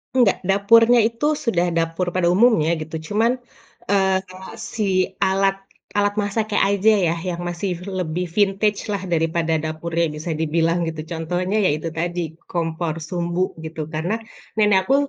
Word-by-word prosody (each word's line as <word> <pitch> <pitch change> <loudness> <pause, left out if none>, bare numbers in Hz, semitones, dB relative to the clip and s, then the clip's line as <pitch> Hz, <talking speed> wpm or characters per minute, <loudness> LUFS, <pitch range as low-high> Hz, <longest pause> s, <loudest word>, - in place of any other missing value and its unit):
Enggak, 245 -6 +4
dapurnya 230 +5 +5
itu 230 +4 -4 0.2
sudah 180 -8 +1
dapur 165 +2 -1
pada 180 -2 +2
umumnya 185 -8 +4
gitu, 155 +1 -6
cuman, 225 +3 +2 0.6
eee, 190 -1 +3
kalau 185 +1 -10 0.2
si 220 - -1 0.4
alat 195 0 +2 0.4
alat 205 0 +2
masaknya 215 +1 -1
aja 200 +2 +3 0.2
ya, 165 - +2 0.2
yang 175 0 -5
masih 175 +2 -3 0.3
lebih 175 +1 -2
vintage 205 +1 +1
lah, 200 - -1
daripada 165 -1 +1
dapurnya 165 +2 -1
bisa 155 +2 -4
dibilang 165 +2 +1
gitu, 160 -1 -4
contohnya 175 +4 -2
ya - - +4
itu 165 - -5
tadi, 175 +1 -2 0.3
kompor 165 -2 -1
sumbu 175 +2 -2 0.2
gitu. 160 0 -6
Karena, 165 +7 -1 0.4
nenek 210 -2 +4
aku 270 - +4
180 Hz, 145 wpm, -21 LUFS, 165-205 Hz, 0.6 s, dapurnya